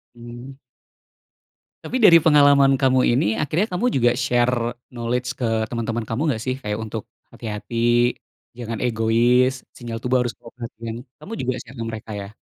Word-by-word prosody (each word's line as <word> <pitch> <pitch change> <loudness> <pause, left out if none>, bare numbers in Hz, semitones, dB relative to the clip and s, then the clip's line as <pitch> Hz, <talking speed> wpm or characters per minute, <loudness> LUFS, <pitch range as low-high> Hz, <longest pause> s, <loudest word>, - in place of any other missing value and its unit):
Mmm. 120 +3 -10 1.3
Tapi 255 - -2
dari 170 -4 +9
pengalaman 145 -3 +6
kamu 130 -1 +4
ini, 125 - +2 0.2
akhirnya 160 +8 0
kamu 240 - -1
juga 120 -2 +4
share 120 0 +2 0.3
knowledge 125 +1 -2
ke 120 - 0 0.2
teman-teman 115 -1 -2
kamu 115 +6 -2
nggak 110 - -5
sih? 130 0 -1
Kayak 105 +1 -3
untuk, 110 -1 -5 0.3
"Hati-hati, 110 +1 -7 0.8
jangan 115 -3 -5
egois, 120 +2 +3 0.2
sinyal 120 -2 -6
tubuh 125 +1 +1
harus 120 - -3
kamu 115 - -13
perhatiin." 115 -1 -7 0.3
Kamu 215 - -10
juga 130 0 -1
share 125 +2 -14
ke 115 - -3
mereka, 110 0 -8
ya? 100 - -7
120 Hz, 155 wpm, -22 LUFS, 115-130 Hz, 1.3 s, dari